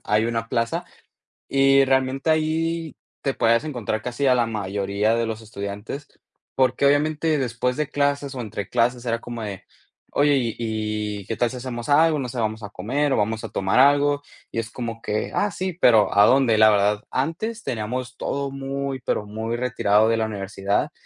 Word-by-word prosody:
Hay 105 Hz, +1 st, +2 dB
una 115 Hz, -1 st, -2 dB
plaza. 115 Hz, -1 st, -1 dB, 0.6 s
Y 135 Hz, 0 st, +4 dB
realmente 135 Hz, +2 st, +1 dB
ahí 160 Hz, +1 st, 0 dB, 0.2 s
te 135 Hz, -, -1 dB
puedes 115 Hz, +4 st, +2 dB
encontrar 120 Hz, -7 st, -3 dB
casi 125 Hz, +4 st, -2 dB
a 130 Hz, -, +5 dB
la 120 Hz, -2 st, +2 dB
mayoría 100 Hz, 0 st, -1 dB
de 115 Hz, 0 st, 0 dB
los 110 Hz, 0 st, -5 dB
estudiantes, 105 Hz, +6 st, -6 dB, 0.5 s
porque 130 Hz, +1 st, +2 dB
obviamente 155 Hz, +2 st, +2 dB
después 125 Hz, -1 st, -1 dB
de 150 Hz, -1 st, -2 dB
clases 140 Hz, -1 st, 0 dB
o 130 Hz, -, -5 dB
entre 105 Hz, -4 st, -5 dB
clases 120 Hz, +1 st, +1 dB
era 115 Hz, -1 st, -1 dB
como 120 Hz, -1 st, -7 dB
de 100 Hz, -3 st, -6 dB, 0.5 s
oye, 145 Hz, 0 st, +3 dB
¿y 120 Hz, -4 st, -1 dB
y 105 Hz, -2 st, -3 dB
qué 115 Hz, -, -3 dB
tal 120 Hz, +2 st, +1 dB
si 130 Hz, -, -7 dB
hacemos 120 Hz, -2 st, -6 dB
algo? 155 Hz, +2 st, +4 dB
No 130 Hz, -3 st, -3 dB
sé, 125 Hz, +1 st, -6 dB
vamos 110 Hz, 0 st, -2 dB
a 100 Hz, -, -7 dB
comer 135 Hz, +7 st, -1 dB
o -, -, +2 dB
vamos 110 Hz, +1 st, -1 dB
a -, -, -4 dB
tomar 95 Hz, +4 st, 0 dB
algo. 145 Hz, +1 st, +4 dB, 0.3 s
Y -, -, -5 dB
es 115 Hz, -1 st, -2 dB
como 115 Hz, -2 st, -5 dB
que, 105 Hz, -1 st, -2 dB
ah, 205 Hz, -, +1 dB
sí, 185 Hz, +2 st, -3 dB
¿pero 110 Hz, -4 st, +5 dB
a 100 Hz, +1 st, +8 dB
dónde? 130 Hz, -4 st, +4 dB
La 110 Hz, 0 st, +7 dB
verdad, 105 Hz, 0 st, +2 dB
antes 215 Hz, -, -2 dB
teníamos 125 Hz, +3 st, -4 dB
todo 140 Hz, +1 st, -3 dB
muy, 135 Hz, 0 st, -4 dB
pero 115 Hz, -, -1 dB
muy 110 Hz, +3 st, -3 dB
retirado 110 Hz, -4 st, +2 dB
de 115 Hz, -, +2 dB
la 110 Hz, -1 st, 0 dB
universidad 100 Hz, -1 st, -2 dB
120 Hz, 190 wpm, -23 LUFS, 110-140 Hz, 0.6 s, a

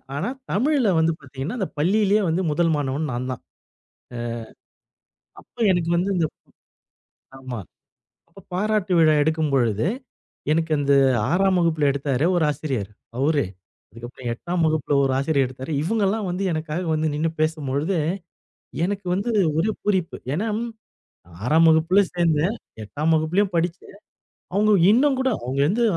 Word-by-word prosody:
ஆனா, 180 Hz, +11 st, -2 dB, 0.2 s
தமிழ்ல 255 Hz, +1 st, +2 dB
வந்து 160 Hz, +1 st, +3 dB
பார்த்தீங்கன்னா, 135 Hz, -, -6 dB
அந்த 190 Hz, -, -1 dB
பள்ளியிலேயே 205 Hz, +5 st, +3 dB
வந்து 170 Hz, +4 st, 0 dB
1 165 Hz, +2 st, +2 dB
மாணவன் 145 Hz, +1 st, -2 dB
நான் 125 Hz, +2 st, -3 dB
தான். 125 Hz, -, -6 dB, 2.0 s
அ, -, -, -9 dB
அப்போ 240 Hz, -, -18 dB
எனக்கு 170 Hz, -1 st, 0 dB
வந்து 185 Hz, +3 st, 0 dB
இந்த 165 Hz, -2 st, +2 dB, 1.1 s
ஆமா. 130 Hz, -4 st, -6 dB, 0.7 s
அப்போ 195 Hz, +4 st, -15 dB
பாராட்டு 205 Hz, 0 st, 0 dB
விழா 155 Hz, -1 st, +5 dB
எடுக்கும்பொழுது, 140 Hz, -7 st, +1 dB, 0.7 s
எனக்கு 160 Hz, 0 st, 0 dB
அந்த 140 Hz, 0 st, +2 dB, 0.4 s
6ஆம் 190 Hz, +1 st, +3 dB
வகுப்புல 155 Hz, -4 st, +2 dB
எடுத்தாரு 140 Hz, +1 st, 0 dB
ஒரு 165 Hz, -, +2 dB
ஆசிரியர் 130 Hz, -8 st, -3 dB, 0.3 s
அவுரே 145 Hz, -3 st, +2 dB, 0.4 s
அதுக்கப்புறம் 120 Hz, +2 st, -8 dB
8ஆம் 170 Hz, +7 st, -2 dB
வகுப்புல 155 Hz, -2 st, 0 dB
ஒரு 135 Hz, -, +1 dB
ஆசிரியர் 140 Hz, -2 st, +1 dB
எடுத்தாரு. 130 Hz, +4 st, -7 dB
இவங்க 215 Hz, +6 st, 0 dB
எல்லாம் 210 Hz, 0 st, -1 dB
வந்து 180 Hz, +2 st, -3 dB
எனக்காக 155 Hz, +2 st, -3 dB
வந்து 155 Hz, 0 st, 0 dB
நின்னு 160 Hz, +2 st, 0 dB
பேசும்பொழுது, 155 Hz, +2 st, 0 dB, 0.9 s
எனக்கு 200 Hz, 0 st, -3 dB
வந்து 200 Hz, +5 st, -2 dB, 0.3 s
ஒரே 210 Hz, +7 st, +2 dB
பூரிப்பு. 190 Hz, -5 st, 0 dB, 0.2 s
ஏனா 210 Hz, +8 st, -1 dB, 1.0 s
6ஆம் 160 Hz, +5 st, +4 dB
வகுப்புல 165 Hz, +5 st, +4 dB
சேர்ந்தேன். 170 Hz, +3 st, +1 dB, 0.3 s
8ஆம் 150 Hz, +9 st, -1 dB
வகுப்பிலும் 180 Hz, +5 st, +1 dB
படிச்சேன். 175 Hz, +3 st, -3 dB, 0.6 s
அவங்க 210 Hz, +1 st, +3 dB, 0.2 s
இன்னும் 265 Hz, +3 st, +3 dB
கூட 265 Hz, -, +2 dB
அவங்க 130 Hz, +3 st, -2 dB
வந்து 230 Hz, +6 st, +1 dB
160 Hz, 135 wpm, -23 LUFS, 145-190 Hz, 2.0 s, விழா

